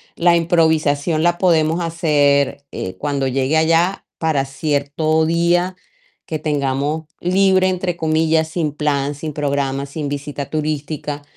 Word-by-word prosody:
la 170 0 +4
improvisación 160 -2 +2
la 175 0 +2
podemos 165 -2 +2
hacer, 145 -5 +1
eh, 95 - -5
cuando 140 -2 -1
llegue 135 +4 +1
allá 165 +4 +2
para 155 -4 0
cierto 150 +3 0
día 175 +2 +1 0.5
que 155 - -2
tengamos 145 +1 -1 0.2
libre, 190 +1 +3
entre 180 -1 -2
comillas, 160 0 +1
"sin 160 -2 -1
plan, 145 -1 -1
sin 155 +1 -6
programa, 140 -1 -1
sin 145 0 -4
visita 145 0 -5
turística" 150 -1 -3
155 Hz, 125 wpm, -19 LUFS, 145-165 Hz, 0.5 s, la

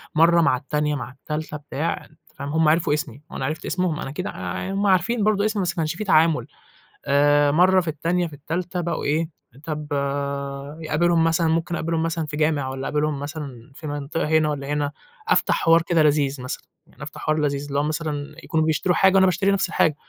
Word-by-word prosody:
مرّه 170 +2 +5
مع 130 -6 +3
التانية 150 +2 -1
مع 130 -2 -5
التالتة 150 +3 -5
بتاع، 150 +2 -3
أنتِ 155 - -24 0.2
فاهمة، 145 +2 -5
هم 160 -1 +4
عرفوا 160 -2 +2
اسمي 145 -2 -3
وأنا 130 - -3
عرفت 155 +3 -4
اسمهم، 180 -4 -1
أنا - - -4
أكيد 180 +7 -4
آآ، 95 - -4
هم 200 +1 +1
عارفين 200 +4 +2
برضه 210 -1 +2
اسمي 215 -2 0
بس 180 - 0
ما - - -14
كانش 160 -1 -1
في 215 - -4
تعامُل، 160 - +3 0.6
آآ، 145 +1 +4
مرّه 185 +4 +5
في 170 - -9
التانية 170 +3 0
في 155 - -12
التالتة 175 +5 -3
بقوا 170 0 -2
إيه 155 +3 0 0.3
طَب 150 -1 -4
آآ، 140 +1 -3
يقابلهم 165 +2 +2
مثلًا، 165 0 +2
ممكن 165 +1 0
أقابلهم 165 -1 -1
مثلًا 165 -1 -1
في 150 0 -6
جامع، 150 -3 +1
والَّا 130 0 -4
أقابلهم 150 -1 0
مثلًا 145 -5 -7
في 155 - -8
منطقة 145 +2 -3
هنا 155 -1 +3
والَّا 140 -2 -4
هنا، 145 -1 -1 0.4
أفتح - - +3
حوار 165 0 +6
كده 165 -2 +2
لذيذ 145 -3 +2
مثلًا 130 - -5 0.4
أفتح - - -8
حوار 155 0 +1
لذيذ، 145 -1 -1
اللي 140 0 -1
هو - - +1
مثلًا 150 -1 -3
يكونوا 160 -1 +1
بيشتروا 160 +3 +1
حاجة 190 0 +4
وأنا 190 - +6
باشتري 190 +2 +2
نَفْس 195 -2 +1
الحاجة، 155 -3 +2
155 Hz, 205 wpm, -23 LUFS, 145-170 Hz, 0.6 s, حوار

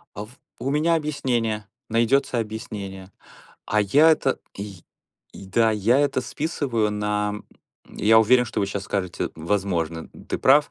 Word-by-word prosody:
А 105 - -5
в - - -18 0.3
у 135 - -2
меня 155 +4 +2
объяснение, 120 -9 -1 0.2
найдется 120 +3 +2
объяснение, 105 -4 -6 0.6
а 105 0 +2
я 145 +11 +5
это 135 -4 +1 0.2
й 100 -3 -8 0.5
и 95 - -11
да, 115 +3 +3
я 110 +4 +2
это 145 -2 +1
списываю 125 -7 -1
на, 105 0 -1
м, 105 - -10 0.5
я 110 +2 +5
уверен, 125 +3 +5
что 115 - -3
вы 100 - +1
щас 100 0 -4
скажете: 95 -3 -2
"М, - - -4 0.2
возможно, 85 -5 -1
м, - - -13
ты - - -3
прав". 145 +2 +4
110 Hz, 165 wpm, -23 LUFS, 100-130 Hz, 0.6 s, я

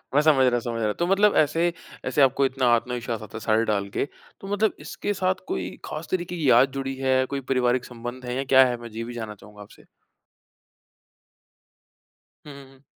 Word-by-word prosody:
मैं 145 - +6
समझ 145 -4 +4
रहा 120 -1 +2
समझ 115 -1 -4
रहा, 105 -1 +1
तो 175 - -1
मतलब 200 +2 +4
ऐसे 165 +3 +2 0.3
ऐसे 145 - +1
आपको 135 +1 +4
इतना 130 -1 0
आत्मविश्वास 120 -2 -3
आता 110 - -11
है - - -5
साड़ी 110 +2 +2
डाल 100 -2 -1
के, - - -1 0.4
तो 195 - -8
मतलब 215 +1 +2
इसके 205 - -3
साथ 185 -1 -1
कोई - - -3 0.2
ख़ास 155 +2 -6
तरीके 175 -1 -2
की 145 -5 +1
याद 125 +3 +5
जुड़ी 135 0 -4
है, 130 0 +1
कोई 140 +1 -4
पारिवारिक 125 -1 +2
संबंध 120 +1 -8
है 125 0 -3
या 135 - -1
क्या 130 0 +8
है? 120 -1 -2
मैं 120 - -8
ज - - -15
ये 115 - -3
भी 120 +1 -7
जानना 110 -3 -6
चाहूँगा 105 +1 -15
आपसे। 105 - -15 2.6
हुँ, 145 - -9
हुँ, 135 -1 -13
हुँ। 135 +1 -24
130 Hz, 210 wpm, -25 LUFS, 120-150 Hz, 2.6 s, क्या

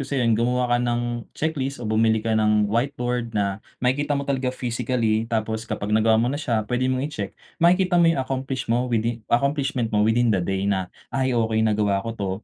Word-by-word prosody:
sa'yo 135 -2 -1
yun, 115 - +4
gumawa 125 +3 +1
ka - - +3
ng 120 -1 -2
checklist, 140 -3 -2
o 120 - -7
bumili 110 +1 +2
ka 115 - 0
ng 105 -1 +3
whiteboard 120 -1 -1
na, 100 0 -1 0.2
makikita 145 +3 +1
mo 140 - -3
talaga 135 -2 0
physically. 120 -3 -1
Tapos 110 0 -1
kapag 105 +1 -3
nagawa 110 0 +4
mo 115 - +2
na 145 - -3
siya 115 -7 0
pwede 125 +2 0
mong 130 +1 0
i-check. 105 -10 -6 0.3
Makikita 180 0 +4
mo 165 - +5
yung 165 - 0
accomplish 130 0 -3
mo 120 +2 +1
within 115 0 0
accomplishment 135 -2 0
mo 105 - +3
within 115 +2 +3
the 95 - +1
day 95 +2 -1
na, 95 -2 0 0.2
"Ay 130 -2 0
okay 110 -1 +1
nagawa 105 -2 +1
ko 115 - -4
'to." 100 -2 -2
120 Hz, 205 wpm, -23 LUFS, 110-130 Hz, 0.3 s, mo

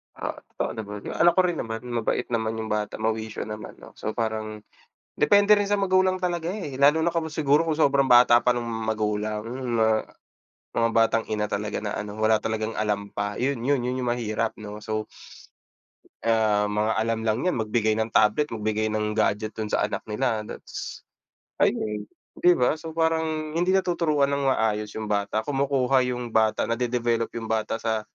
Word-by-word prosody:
Oo, - - -3 0.2
totoo - - -2
naman. 105 -2 -7
Yung - - -5
anak 170 +1 +6
ko 185 - +6
rin 175 -3 0
naman, 110 0 -4
mabait 115 -2 -1
naman 110 -1 -1
yung 110 -1 -4
bata, 105 -1 -1
mawisyo 110 0 -2
naman, 110 0 -8
'no. - - -14
So, 110 - -4
parang 110 -2 -3 0.5
depende 205 +6 +5
rin 205 -1 +2
sa 205 - +2
magulang 185 -1 +2
talaga, 175 -2 -1
eh. 175 -9 -5
Lalo 150 +3 +5
na 170 - +2
kung 165 -1 -1
siguro, 150 -1 +2
kung 155 -2 0
sobrang 140 -3 +3
bata 120 -1 +7
pa 125 - +3
nung 120 -1 -3
magulang 110 -2 -2 0.3
na 110 -1 +2 0.6
mga 115 0 +1
batang 115 0 +3
ina 105 -1 -1
talaga 105 +1 -2
na 105 - -2
ano, 105 0 -6
wala 110 0 +4
talagang 110 0 -3
alam 105 -1 -1
pa. 100 0 -3
Yun 135 0 0
yun 140 -1 +2
yun 125 +1 -2
yung 120 - +1
mahirap 115 -2 -1
'no. 105 0 -7
So 110 0 -3 1.2
ah, 110 -2 +3
mga 105 +1 0
alam 115 +1 0
lang 110 -1 +1
n'yan, 180 - +1
magbigay 110 0 +1
ng 110 +1 -1
tablet, 110 +8 +3
magbigay 110 0 -1
ng 105 0 -1
gadget 110 0 0
dun 110 -1 -4
sa - - +1
anak 105 - -4
nila, 110 0 0
that's - - -8 0.6
ayun, 105 -1 0 0.3
'di 175 0 +6
ba? 125 +2 +3
So, 160 +1 -7
parang 160 -1 -1
hindi 175 +3 +1
natuturuan 165 -7 +2
ng 140 -1 +1
maayos 105 -4 0
yung 110 - -4
bata, 105 +1 -1
kumukuha 135 -2 +2
yung 120 -2 -4
bata, 110 -1 +2
nade-develop 120 -1 0
yung 115 - -5
bata 110 0 -1
sa 110 -1 -1
115 Hz, 180 wpm, -25 LUFS, 110-140 Hz, 1.2 s, bata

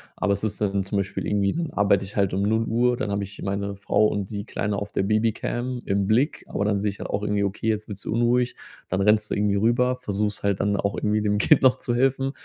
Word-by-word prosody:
aber 105 -1 +1
es 100 - -4
ist 105 -1 -2
dann 100 -2 0
zum 100 +2 -3
Beispiel 100 0 -2
irgendwie, 100 -1 +1
dann 165 -2 -3
arbeite 100 -1 +3
ich 100 - -10
halt 100 -3 +1
um 95 - 0
0:00, 115 +3 +1
dann 120 -6 -2
habe 100 0 -1
ich 100 +1 -10
meine 100 0 -2
Frau 100 +2 +2
und 100 -1 -3
die 100 +1 -4
Kleine 105 -3 -2
auf 100 +1 -5
der - - 0
Babycam 115 +4 -1
im 100 0 0
Blick, 125 +9 +1
aber 100 - -2
dann 100 -1 +1
sehe 105 +1 0
ich 100 - -7
halt - - -5
auch 100 - -1
irgendwie: 105 -1 0
„Okay, 100 +3 -3
jetzt 110 -1 -1
wird 100 -2 -5
sie - - -6
unruhig”, 120 +2 +1 0.3
dann 95 - -1
rennst 105 +1 +3
du - - -1
irgendwie 100 -1 +1
rüber, 120 +4 +2
versuchst 105 -2 -2
halt 100 -2 0
dann 100 0 +1
auch 100 0 -1
irgendwie 105 0 0
dem 105 -1 +1
Kind 150 +7 +4
noch 130 -1 +5
zu 120 - -3
helfen, 135 +2 +1
105 Hz, 255 wpm, -24 LUFS, 100-115 Hz, 0.3 s, noch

